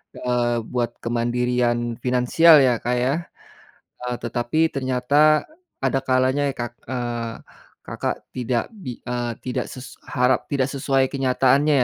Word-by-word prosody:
eee, 120 -1 0
buat 120 -1 -2
kemandirian 120 0 0
finansial 130 +6 +5
ya, 125 -2 +3
Kak, 125 +1 0
ya? 130 +4 +1 0.9
Eee, 125 - -1
tetapi 120 +7 0
ternyata 140 +4 +3 0.4
ada 135 0 +2
kalanya 130 +2 +2
ya - - -3
Kak 120 0 -4
eee, 120 -2 -3 0.5
Kakak - - -2 0.2
tidak 120 -1 -1
bi 135 - -8
eee, 120 -1 -2
tidak 125 - -2
ses 130 0 -10
harap 125 +1 +1
tidak 135 -1 +1
sesuai 135 -1 +1
kenyataannya 135 +1 +3
125 Hz, 125 wpm, -22 LUFS, 120-135 Hz, 0.9 s, finansial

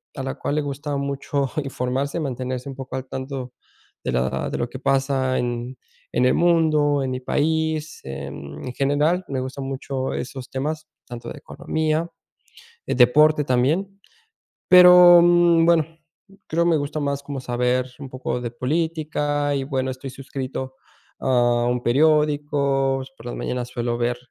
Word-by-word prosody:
a 135 - -4
la 130 - -4
cual 145 - -3
le 150 - +1
gustaba 145 0 -4
mucho 140 0 -2
informarse, 135 +3 -2
mantenerse 130 -3 -4
un 135 - -7
poco 135 0 -7
al 130 0 -6
tanto 130 -1 -6 0.5
de - - -2
la 65 +1 -1
de - - -3
lo 120 - -1
que 130 - -8
pasa 135 -1 +1
en 120 +1 -3 0.4
en 125 - +2
el 125 - +4
mundo, 155 -4 +3
en 130 - -2
mi 130 0 -4
país, 160 +2 -1
en 70 - -7
general. 145 +7 +1
Me 135 -2 -2
gustan 130 +1 -5
mucho 135 0 -3
esos 130 0 -6
temas, 155 +4 -3 0.2
tanto 120 -1 -8
de - - -8
economía, 160 +1 -2 0.8
de - - 0
deporte 150 +4 +5
también. 160 +11 0 0.7
Pero, 180 -1 +9
mm, 175 -1 +5
bueno, 165 -3 +4 0.6
creo 170 +2 +1
me 170 -2 +3
gusta 145 +1 -3
más 140 -1 -2
como 140 -1 -5
saber 125 0 0
un 140 -2 -8
poco 130 -1 -4
de 120 - -3
política 145 +1 -1
y 135 - -1
bueno, 130 -1 -2
estoy 130 +1 -7
suscrito 130 0 -6 0.4
a 120 -2 +2
un 125 0 -1
periódico, 145 -1 +2
por 115 - -14
las 120 - -5
mañanas 125 -1 -3
suelo 120 -1 -2
ver 120 0 0
135 Hz, 155 wpm, -22 LUFS, 125-150 Hz, 0.8 s, Pero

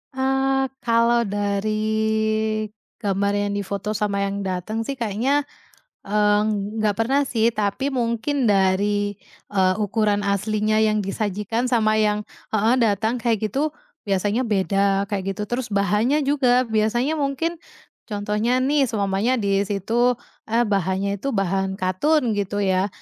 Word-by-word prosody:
Eee, 270 0 +1
kalau 235 0 +2
dari 205 +1 -1 1.2
gambar 200 0 +1
yang 205 0 0
difoto 200 +1 -3
sama 200 -1 -1
yang 200 0 -2
dateng 190 +4 -3
sih 275 - -2
kayaknya, 245 +5 0 0.6
eee, 210 0 +2 0.4
nggak 210 -2 +1
pernah 270 +5 +2
sih. 230 -4 +1
Tapi 210 +6 -1
mungkin 250 +2 -1
dari, 205 +1 +2 0.3
eee, 190 -2 +2
ukuran 210 0 +1
aslinya 215 +2 +1
yang 215 -1 +2
disajikan 210 +4 -2
sama 215 -3 +3
yang 210 0 +1 0.2
heeh, 220 +3 +3
datang 220 0 +1
kayak 225 -2 0
gitu, 295 +5 0 0.3
biasanya 205 +3 0
beda 200 -2 +1
kayak 195 -1 -2
gitu. 210 - -4
Terus 240 +1 -2
bahannya 210 +9 +2
juga, 255 -3 +3
biasanya 230 +7 +1
mungkin, 290 +4 -1 0.5
contohnya 210 +4 0
nih 280 0 +2
seumpamanya 205 +2 0
disitu, 205 +3 +1 0.3
a 230 +2 +2
bahannya 200 -1 -1
itu 275 +3 -2
bahan 195 0 0
katun 230 - +1
gitu 205 0 -1
ya, 190 0 +2
210 Hz, 130 wpm, -22 LUFS, 200-240 Hz, 1.2 s, sama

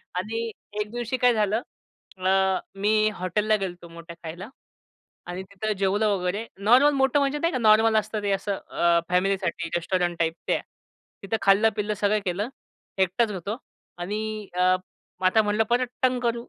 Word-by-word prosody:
आणि 225 +5 -2 0.3
एक 210 0 -3
दिवशी 240 +1 -2
काय 250 -1 +4
झालं? 215 +1 +1 0.6
अ, 185 0 +1 0.5
मी 215 +1 +3
हॉटेलला 210 +3 +1
गेलो 195 -3 -2
होतो, 175 -1 -14
मोठ्या 170 0 -10
खायला 175 +6 -7 0.8
आणि 180 +2 -5
तिथं 200 +3 -4
जेवलं 200 +2 +2
वगैरे 200 +2 -1
नॉर्मल 250 +9 +5
मोठं 270 0 +3
म्हणजे 280 +1 0
नाही 335 +3 0
का 255 - 0
नॉर्मल 220 -1 +5
असतं 215 0 -1
ते 205 - 0
असं 195 +1 -1
अ, 170 0 +3
फॅमिलीसाठी 185 -2 0
रेस्टॉरंट 175 0 -1
टाइप 165 -1 +1
ते. - - +2 0.6
तिथं 195 +3 -1
खाल्लं, 200 +3 +5
पिल्लं 210 0 -1
सगळं 210 +1 +1
केलं 195 +5 -1 0.6
एकटाच 210 +5 0
होतो, 200 +3 -4 0.4
आणि 190 +4 -3 0.4
अ, 180 - -1 0.6
मग 185 - +2
आता 220 +4 +4
म्हटलं 210 +1 +1
परत 245 +1 +2
टंग 255 -1 +3
करू 235 0 -1
210 Hz, 165 wpm, -25 LUFS, 185-225 Hz, 0.8 s, नॉर्मल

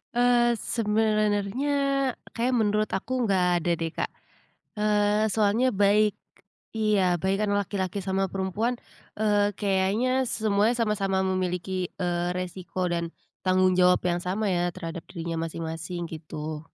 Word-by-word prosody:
Eee 240 -1 +4
,sebenernya, 215 +2 0 0.6
kayaknya 245 +2 0
menurut 215 0 +1
aku 195 - -10 0.2
enggak 190 -3 +2 0.2
ada 175 - -1
deh, 165 0 -3
Kak. - - -3 0.7
Eee, 210 0 +2
soalnya 225 +4 +3
baik 205 +1 +3 0.6
iya 200 -5 +2
baik 190 +1 +1
kan 210 - 0
laki-laki 200 -1 -1
sama 190 0 0
perempuan, 195 +5 -1 0.4
eee, 205 -1 +3
kayaknya 200 +4 +1 0.2
semuanya 215 +1 +1
sama-sama 200 -4 0
memiliki, 185 0 -2
eee, 175 0 -1
resiko 185 0 -3
dan 170 -1 -2 0.3
tanggung 185 0 +3
jawab 180 0 +5
yang 175 0 +1
sama 195 +5 -1
ya, 175 0 +1
terhadap 165 -2 -6
dirinya 170 -2 -4
masing-masing, 165 +1 -5
gitu. 155 -1 -6
195 Hz, 125 wpm, -26 LUFS, 180-215 Hz, 0.7 s, jawab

